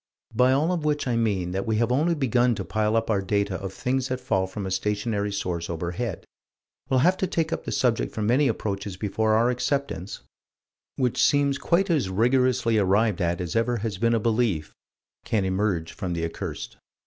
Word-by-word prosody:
By 125 +3 +4
all 150 +6 +2
of 175 -4 -1
which 150 -2 0
I 120 - +1
mean 100 -6 0
that 95 +3 -3
we 110 - +1
have 115 +2 +1
only 160 +7 +2
begun 125 -4 +2
to - - -5
pile 110 0 0
up 115 0 +1
our 100 -2 +1
data 100 -1 -1
of 95 -1 -4
things 130 +5 -1
that 130 -1 -3
fall 95 -8 0
from 95 +1 -6
a 95 - -4
stationary 105 +1 -1
source 90 -4 -3
overhead: 85 +4 -4 0.6
we'll 130 -1 +3
have 180 +5 +4
to 190 - 0
take 165 -2 -1
up - - -4
the - - -3
subject 120 -3 +1
from 110 - -3
many 130 +6 +3
approaches 100 -4 -3
before 110 +2 +1
our 120 +3 +3
acceptance, 125 - -2 0.7
which 125 -3 +1
seems 140 -1 +3
quite 185 +2 +1
as 145 - +1
rigorously 120 +2 +2
arrived 100 +1 +2
at 85 +1 0
as 90 -2 -4
ever 115 +1 +1
has 105 -3 -4
been 115 0 +3
a - - +2
belief, 110 -8 0 0.5
can 105 -4 0
emerge 95 -3 -1
from 95 -4 -4
the 85 -1 -1
accursed. 80 - -6
110 Hz, 195 wpm, -25 LUFS, 95-125 Hz, 0.7 s, By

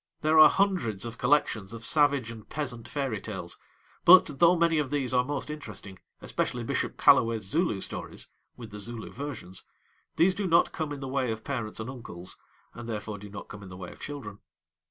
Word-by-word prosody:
There 155 +1 +4
are 155 - +10
hundreds 150 - 0
of 115 +1 -7
collections 125 -6 +1
of 115 0 -7
savage 140 -4 +3
and 110 -2 -11
peasant 125 -6 -3
fairy 130 -5 -3
tales, - - -6 0.4
but, 170 -6 +7
though 170 +1 +6
many 170 -2 +3
of 145 -3 -1
these 135 -4 -1
are 125 0 +4
most 145 +2 -4
interesting, 105 -10 -8 0.2
especially - - -2
Bishop - - -2
Callaway's 115 -2 +4
Zulu 110 - 0
stories - - -6 0.3
(with 115 -3 -10
the 105 - -8
Zulu 115 +2 -7
versions), 125 -9 -7 0.5
these 185 +3 +4
do 200 0 -2
not 170 0 +4
come 155 -3 -4
in 145 -1 -6
the 135 - -4
way 130 -2 0
of 110 0 -5
parents 120 -7 -4
and 110 - -5
uncles, 90 -9 -7 0.4
and 120 0 -8
therefore 105 -1 -4
do 105 +1 -10
not 100 0 -9
come 105 - -10
in 95 - -10
the 90 - -9
way 90 -2 -8
of - - -15
children. 125 -9 -7
125 Hz, 195 wpm, -28 LUFS, 110-145 Hz, 0.5 s, are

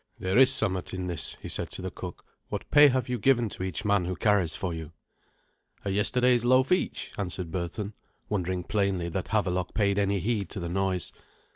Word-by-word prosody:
"There 95 +6 +1
is 135 0 +7
somewhat 95 -8 0
in 90 0 -3
this," 85 -6 -1
he - - -5
said - - -3
to - - -7
the - - -3
cook. - - -8 0.2
"What - - -5
pay 145 0 +9
have 130 -2 +1
you 125 -1 -2
given 120 0 +3
to - - -8
each 95 0 -3
man 100 -3 +2
who 90 +1 -2
carries 90 -3 +2
for 90 -1 -3
you?" 80 -1 -7 0.9
"A 100 - 0
yesterday's 120 +4 +2
loaf 130 +4 +4
each," 185 - 0
answered 90 -3 -3
Berthun, 95 +4 -4 0.3
wondering 90 -3 -1
plainly 95 -4 0
that 90 +2 -3
Havelok 90 -4 0
paid 100 -2 +2
any 100 0 +1
heed 100 -1 -1
to 100 - -5
the 85 -1 -4
noise. 95 0 -1
100 Hz, 195 wpm, -28 LUFS, 90-110 Hz, 0.9 s, pay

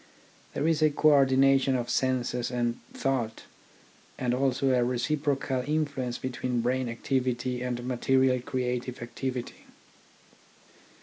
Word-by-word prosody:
There 145 - 0
is 160 -2 +2
a 155 - +5
co 155 +1 +3
ordination 135 -1 +4
of 120 -1 -2
senses 125 -2 0
and 120 -1 -1
thought, 120 -5 -2 0.7
and 125 -1 0
also 135 +1 +1
a 125 -1 +3
reciprocal 135 +1 0
influ 150 0 -1
ence 125 -2 -2
between 125 -1 -2
brain 125 +1 0
activity 125 0 -1
and 125 -1 -3
material 130 0 +2
creative 125 -2 -3
activity. 125 +1 -5
130 Hz, 120 wpm, -28 LUFS, 125-135 Hz, 0.7 s, a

